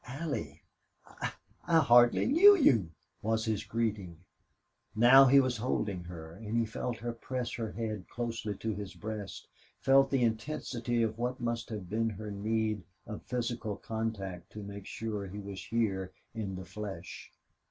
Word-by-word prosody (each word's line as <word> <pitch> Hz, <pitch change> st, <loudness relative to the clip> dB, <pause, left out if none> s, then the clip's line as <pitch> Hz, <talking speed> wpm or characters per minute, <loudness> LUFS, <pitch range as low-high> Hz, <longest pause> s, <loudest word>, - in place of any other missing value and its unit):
"Allie!... 125 Hz, -, -4 dB, 0.4 s
I -, -, -5 dB, 0.3 s
I 165 Hz, -, +5 dB
hardly 120 Hz, -5 st, +6 dB
knew 375 Hz, +10 st, +8 dB
you!" 115 Hz, -, +4 dB, 0.3 s
was 110 Hz, +1 st, 0 dB
his 110 Hz, -3 st, -1 dB
greeting. 105 Hz, -7 st, -2 dB, 0.7 s
Now 125 Hz, +5 st, +8 dB
he 140 Hz, +2 st, +7 dB
was 130 Hz, -3 st, +1 dB
holding 105 Hz, -6 st, -2 dB
her, 80 Hz, -2 st, -8 dB
and 110 Hz, +4 st, -4 dB
he 115 Hz, -, +3 dB
felt 115 Hz, +2 st, -4 dB
her 120 Hz, 0 st, -4 dB
press 125 Hz, +1 st, -4 dB
her 115 Hz, -2 st, -4 dB
head 110 Hz, -4 st, -4 dB
closely 115 Hz, -3 st, -3 dB
to 110 Hz, +2 st, -3 dB
his 100 Hz, -1 st, -7 dB
breast, 105 Hz, -2 st, -6 dB, 0.3 s
felt 135 Hz, +1 st, +5 dB
the 135 Hz, -3 st, +2 dB
intensity 120 Hz, 0 st, -1 dB
of 110 Hz, 0 st, -2 dB
what 125 Hz, +1 st, -1 dB
must 115 Hz, -1 st, -2 dB
have 105 Hz, -5 st, -5 dB
been 115 Hz, +4 st, 0 dB
her 105 Hz, 0 st, -6 dB
need 110 Hz, +1 st, -1 dB, 0.2 s
of 105 Hz, -, -7 dB
physical 120 Hz, -3 st, -3 dB
contact 100 Hz, -6 st, -4 dB
to 105 Hz, -, -7 dB
make 100 Hz, -1 st, -8 dB
sure 105 Hz, -3 st, -4 dB
he 95 Hz, +2 st, -8 dB
was 100 Hz, -1 st, -7 dB
here 95 Hz, -5 st, -1 dB, 0.2 s
in 100 Hz, -4 st, -4 dB
the 95 Hz, 0 st, -7 dB
flesh. 95 Hz, -2 st, -7 dB
110 Hz, 160 wpm, -31 LUFS, 100-120 Hz, 0.7 s, knew